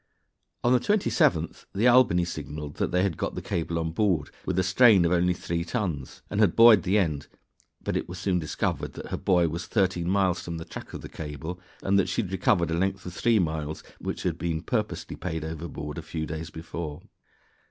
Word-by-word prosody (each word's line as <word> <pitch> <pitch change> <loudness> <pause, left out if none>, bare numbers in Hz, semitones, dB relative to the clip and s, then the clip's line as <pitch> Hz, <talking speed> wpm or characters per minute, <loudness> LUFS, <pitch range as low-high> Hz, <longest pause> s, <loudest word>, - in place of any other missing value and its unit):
On 120 - +4
the 125 - +5
27th 205 - +1
the 110 +5 +3
Albany 120 -9 +5
signaled 75 -3 -6
that - - 0
they 90 +1 +2
had 95 -6 0
got - - -3
the - - -2
cable 85 0 -2
on 80 0 -1
board 90 -5 +1 0.2
with - - 0
a 95 - +3
strain 95 0 +6
of 85 - +2
only 90 0 +3
three 85 -1 -2
tons, 85 - -3
and 105 - -3
had 105 -6 +4
buoyed 115 -4 +8
the 95 +5 +2
end, 75 -8 0 0.6
but - - -2
it - - -2
was 90 - -6
soon 90 -1 0
discovered 75 -2 -2
that - - -8
her - - -2
buoy 90 -3 +3
was 85 +1 -3
thirteen 95 -4 +1
miles 95 -2 +2
from 85 -1 -5
the 80 - -6
track - - -9
of - - -6
the - - -7
cable, 80 +3 -6 0.2
and 100 +1 +3
that 95 - +1
she 115 - 0
had 95 - -7
recovered 90 -3 +2
a 85 - 0
length 95 0 -1
of 90 - -6
three 115 +3 +2
miles 80 -4 -2 0.2
which - - -4
had - - -1
been 80 -2 -2
purposely 110 -3 -2
paid 80 -3 -4
overboard 80 -2 -5
a - - -5
few 80 -1 -4
days 80 +1 -5
before. 80 -2 -6
85 Hz, 215 wpm, -27 LUFS, 80-100 Hz, 0.6 s, buoyed